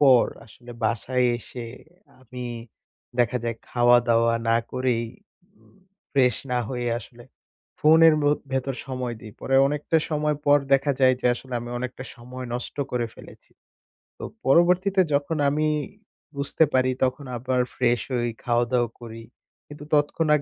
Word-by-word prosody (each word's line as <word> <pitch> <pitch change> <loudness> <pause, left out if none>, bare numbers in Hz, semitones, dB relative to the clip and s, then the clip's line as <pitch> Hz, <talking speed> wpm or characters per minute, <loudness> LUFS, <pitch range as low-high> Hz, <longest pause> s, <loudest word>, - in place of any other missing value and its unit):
পর 130 -4 +6 0.2
আসলে 120 +2 -15
বাসায় 125 +3 +1
এসে 120 0 -6 0.5
আমি 125 0 -8 0.7
দেখা 120 +1 +2
যায় 115 -1 -2
খাওয়া-দাওয়া 120 -1 +4
না 115 - +4 0.2
করেই 125 -2 0 0.6
উম - - -25 0.4
ফ্রেশ 130 -3 +3
না 125 - +1
হয়ে 125 -2 -3
আসলে 120 0 -13 0.6
ফোনের 160 0 +6
মো 145 - +4 0.2
ভেতর 135 0 -1
সময় 125 -2 -4
দিই। 110 -3 -11
পরে 135 - -1
অনেকটা 150 +3 0
সময় 150 -1 0
পর 145 0 +6 0.2
দেখা 135 +1 +2
যায় 130 -1 +5
যে - - 0
আসলে 130 +1 -8
আমি 120 +1 -7
অনেকটা 125 +1 -6
সময় 125 +1 -8
নষ্ট 125 - -5
করে 120 -1 -1
ফেলেছি। - - -15 0.7
তো - - -10 0.2
পরবর্তীতে 180 +6 +4
যখন 145 +3 0
আমি 155 +2 0 0.7
বুঝতে 140 +3 +1
পারি 130 0 +3
তখন 130 +2 -1
আবার 125 +1 0
ফ্রেশ 120 -1 +1
হই, 120 -1 0
খাওয়া-দাওয়া 120 0 +1
করি। 115 -1 -9 0.4
কিন্তু 145 0 -11
তৎক্ষণাৎ 150 0 +2
125 Hz, 140 wpm, -24 LUFS, 120-145 Hz, 0.7 s, পর